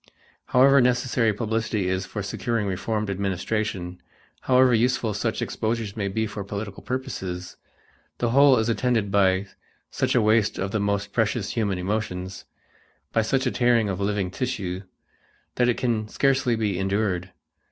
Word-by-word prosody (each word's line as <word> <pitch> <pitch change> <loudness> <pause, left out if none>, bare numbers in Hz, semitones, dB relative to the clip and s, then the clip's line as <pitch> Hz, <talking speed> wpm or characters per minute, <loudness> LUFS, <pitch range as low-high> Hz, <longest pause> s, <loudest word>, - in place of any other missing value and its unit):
However 135 +2 +5
necessary 125 -2 +2
publicity 110 -2 -1
is 95 0 -1
for 105 - -5
securing 115 +2 -2
reformed 105 +2 -2
administration, 95 -1 -2 0.4
however 130 -1 +4
useful 120 -1 +1
such 110 +2 -1
exposures 110 -2 -2
may 100 -3 -2
be 110 +3 -1
for 105 -1 -5
political 100 0 -6
purposes, 95 - -5 0.6
the 120 -1 0
whole 140 0 +6
is 110 0 +1
attended 115 -3 +1
by 95 -1 +3 0.5
such - - 0
a 120 - +5
waste 110 -1 +3
of 95 +1 -2
the 110 - 0
most 100 0 -1
precious 110 -2 0
human 105 -5 -1
emotions, 95 -1 -3 0.7
by 115 - +3
such 130 +5 0
a 125 - +1
tearing 120 -3 +2
of 95 -1 -3
living 100 -2 -1
tissue, 100 -8 -3 0.7
that 125 0 +2
it 120 - +1
can 115 -4 0
scarcely 130 0 +1
be 105 -5 -1
endured. 95 -2 -1
110 Hz, 150 wpm, -25 LUFS, 100-120 Hz, 0.7 s, whole